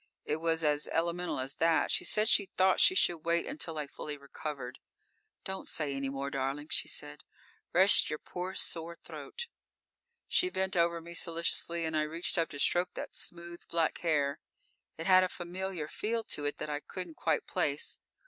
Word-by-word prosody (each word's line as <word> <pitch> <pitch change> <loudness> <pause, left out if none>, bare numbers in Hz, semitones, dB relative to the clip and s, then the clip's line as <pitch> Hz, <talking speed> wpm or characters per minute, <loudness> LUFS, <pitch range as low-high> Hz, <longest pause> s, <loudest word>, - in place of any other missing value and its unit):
It 150 - 0
was 165 0 0
as 150 -1 +3
elemental 170 -1 -1
as 135 +2 -2
that. 165 0 +3
She - - +1
said 215 0 +2
she 200 -3 +4
thought 190 0 +5
we 375 - -5
should 175 - +3
wait 170 +2 +1
until 175 - -4
I 150 - -1
fully 145 +1 -6
recovered._ 140 -1 -6 0.6
"Don't 190 0 -5
say 150 -3 -1
any 135 0 -2
more, 140 +1 -3
darling," 140 +3 -2
she - - +2
said. - - -5 0.5
"Rest 190 +3 +6
your 155 - -2
poor, 180 +4 -5
sore 170 0 0
throat." 475 0 -6 0.8
_She 365 0 +2
bent 190 0 0
over 170 -1 +2
me 170 +1 -9
solicitously 170 0 0
and 160 0 -2
I 155 - +3
reached 165 +3 +1
up 165 - +1
to 145 - -7
stroke 175 +5 +2
that - - -6
smooth 170 0 -6
black 165 -1 +1
hair. 145 -4 +1 0.6
It 165 - -5
had 185 0 +7
a 185 - +1
familiar 180 -2 -4
feel 225 +7 -2
to 145 - -2
it 145 - -1
that - - -4
I 145 - -1
couldn't 180 +2 -6
quite - - +1
place. 145 +1 0
165 Hz, 185 wpm, -32 LUFS, 150-180 Hz, 0.8 s, had